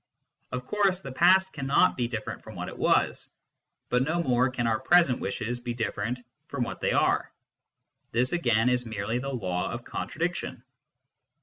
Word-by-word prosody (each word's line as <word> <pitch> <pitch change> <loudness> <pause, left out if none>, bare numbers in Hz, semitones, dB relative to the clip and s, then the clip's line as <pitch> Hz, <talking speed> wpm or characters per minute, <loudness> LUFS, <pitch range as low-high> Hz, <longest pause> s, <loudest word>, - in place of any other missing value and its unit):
Of 125 0 -4
course, 195 -1 +1
the 135 - -7
past 190 +6 +4
cannot 140 -2 +3
be 120 -2 0
different 115 -2 -5
from - - -10
what - - -4
it - - -10
was, - - +1 0.6
but 125 - +2
no 165 +5 0
more 125 -1 +3
can 125 -2 -2
our 110 -1 +1
present 170 -6 +4
wishes 115 +5 -3
be 120 -1 -4
different 115 +1 -2 0.3
from 140 -3 -2
what - - -6
they - - +1
are; - - +2 0.8
this 125 +2 +1
again 120 -9 +2
is 125 0 +2
merely 110 +2 -2
the 135 +2 -4
law 90 -9 -2
of 120 +1 -5
contradiction. 165 -6 -3
125 Hz, 170 wpm, -28 LUFS, 115-140 Hz, 0.8 s, past